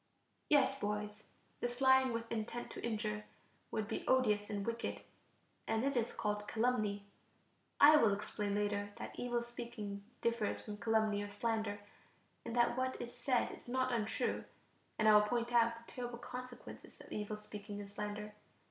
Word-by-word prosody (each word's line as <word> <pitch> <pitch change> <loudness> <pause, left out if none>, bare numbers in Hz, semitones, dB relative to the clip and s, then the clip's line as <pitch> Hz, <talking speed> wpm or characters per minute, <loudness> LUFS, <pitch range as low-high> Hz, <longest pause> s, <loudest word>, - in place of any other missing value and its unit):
Yes, 275 -2 +4
boys, 210 -1 -3 0.3
this 245 0 -3
lying 265 -1 +6
with 230 0 -3
intent 230 +1 -3
to - - -7
injure 160 - -2 0.4
would 215 -1 -2
be 220 - -3
odious 210 -6 +3
and 200 -1 -2
wicked, 230 0 -2 0.7
and 225 +1 +1
it 275 0 +1
is 235 -2 +1
called 210 -1 -2
calumny. 215 -4 +1 0.7
I 300 +1 +10
will 225 -7 +5
explain 205 0 -2
later 205 0 0
that - - -6
evil 240 -1 0
speaking 235 -4 -6 0.2
differs 230 -2 0
from 210 -1 -7
calumny 220 -2 +2
or 205 - -4
slander 215 -1 -1 0.6
in 235 - -5
that 240 0 +3
what 260 0 -1
is 240 0 -6
said 245 0 +1
is - - -10
not 255 +1 +1
untrue, 220 -3 0 0.5
and 220 - +3
I 215 - +9
will 210 - +9
point 235 +3 0
out 230 -1 +5
the 230 0 -14
terrible 245 -1 -4
consequences 250 +1 -9
of - - -13
evil 210 0 -3
speaking 210 -1 -7
and 200 -1 -8
slander. 210 0 -4
225 Hz, 165 wpm, -36 LUFS, 210-240 Hz, 0.7 s, I